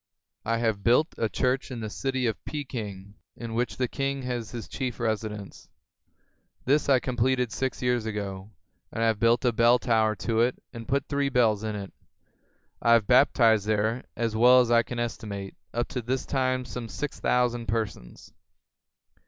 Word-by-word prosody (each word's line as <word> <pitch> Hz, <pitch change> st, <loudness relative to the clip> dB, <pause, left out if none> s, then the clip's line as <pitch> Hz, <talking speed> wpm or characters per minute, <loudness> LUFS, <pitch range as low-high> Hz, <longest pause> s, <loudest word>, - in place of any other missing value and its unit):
I 115 Hz, +1 st, 0 dB
have 110 Hz, -4 st, -1 dB
built 140 Hz, +8 st, +3 dB
a 110 Hz, -, +1 dB
church 130 Hz, +6 st, 0 dB
in 125 Hz, -3 st, -6 dB
the 110 Hz, -, -4 dB
city 130 Hz, +1 st, -2 dB
of 110 Hz, -3 st, -2 dB
Peking, 105 Hz, -9 st, -6 dB, 0.2 s
in 115 Hz, -1 st, -7 dB
which 115 Hz, -4 st, -1 dB
the 125 Hz, -, 0 dB
king 135 Hz, +1 st, -2 dB
has 120 Hz, -3 st, -3 dB
his 115 Hz, -1 st, -7 dB
chief 130 Hz, -3 st, -4 dB
residence. 110 Hz, -3 st, -4 dB, 1.0 s
This 145 Hz, +3 st, +2 dB
I 135 Hz, -2 st, +5 dB
completed 125 Hz, -1 st, 0 dB
six 130 Hz, +1 st, -3 dB
years 125 Hz, -3 st, +1 dB
ago; 100 Hz, -2 st, -5 dB, 0.4 s
and 115 Hz, -, -2 dB
I -, -, +3 dB
have 110 Hz, -2 st, +1 dB
built 115 Hz, +3 st, +3 dB
a 120 Hz, -, +4 dB
bell 120 Hz, +2 st, +5 dB
tower 110 Hz, -3 st, +2 dB
to 115 Hz, +2 st, -1 dB
it 120 Hz, +2 st, +2 dB, 0.2 s
and 115 Hz, -2 st, -8 dB
put 140 Hz, +1 st, 0 dB
three 140 Hz, -1 st, 0 dB
bells 110 Hz, -5 st, +2 dB
in 110 Hz, -1 st, -3 dB
it. 100 Hz, -2 st, -7 dB, 0.9 s
I 115 Hz, -, +5 dB
have 115 Hz, -3 st, +4 dB
baptized 115 Hz, -4 st, +4 dB
there, 110 Hz, +3 st, 0 dB
as 115 Hz, -2 st, -1 dB
well 125 Hz, +3 st, +7 dB
as 120 Hz, -2 st, +2 dB
I 115 Hz, 0 st, +6 dB
can 120 Hz, +1 st, -7 dB
estimate, 105 Hz, -4 st, -4 dB, 0.2 s
up 120 Hz, +1 st, -1 dB
to 130 Hz, -2 st, -3 dB
this 130 Hz, +3 st, -2 dB
time 130 Hz, -1 st, 0 dB
some 125 Hz, -2 st, -6 dB
six 145 Hz, +4 st, -5 dB
thousand 120 Hz, -2 st, +1 dB
persons. 105 Hz, -, -4 dB
120 Hz, 175 wpm, -27 LUFS, 110-125 Hz, 1.0 s, well